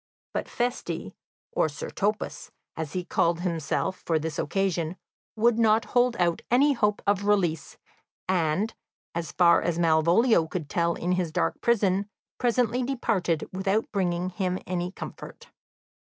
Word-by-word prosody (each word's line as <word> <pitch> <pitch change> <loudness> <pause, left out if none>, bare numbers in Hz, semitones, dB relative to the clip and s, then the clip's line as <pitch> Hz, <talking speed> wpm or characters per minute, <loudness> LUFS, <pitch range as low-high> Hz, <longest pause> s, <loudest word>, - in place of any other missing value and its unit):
But - - -3
Feste, 245 +1 -3 0.4
or 475 - +1
Sir 485 0 -7
Topas, 210 +2 -2 0.3
as 160 -2 -5
he 180 -1 -2
called 170 0 +1
himself 175 +1 -2
for 165 - +1
this 160 +1 -3
occasion, 180 -1 -1 0.4
would 230 +1 +3
not 225 0 +4
hold 245 -1 +3
out 175 -2 +1
any 280 +4 +4
hope 210 -4 0
of 200 0 +1
release, 175 -7 +1 0.5
and, 185 +4 +1 0.4
as 170 -1 -3
far 170 -2 +5
as 170 -1 -1
Malvolio 170 +4 +4
could 160 -3 -5
tell 170 0 +1
in 175 - -2
his 180 -3 0
dark - - -1
prison, 200 -4 +2 0.3
presently 245 0 +1
departed, 220 - 0
without 195 +3 0
bringing 180 -2 -1
him 185 -1 -1
any 180 0 -2
comfort. - - -9
185 Hz, 140 wpm, -27 LUFS, 170-220 Hz, 0.5 s, far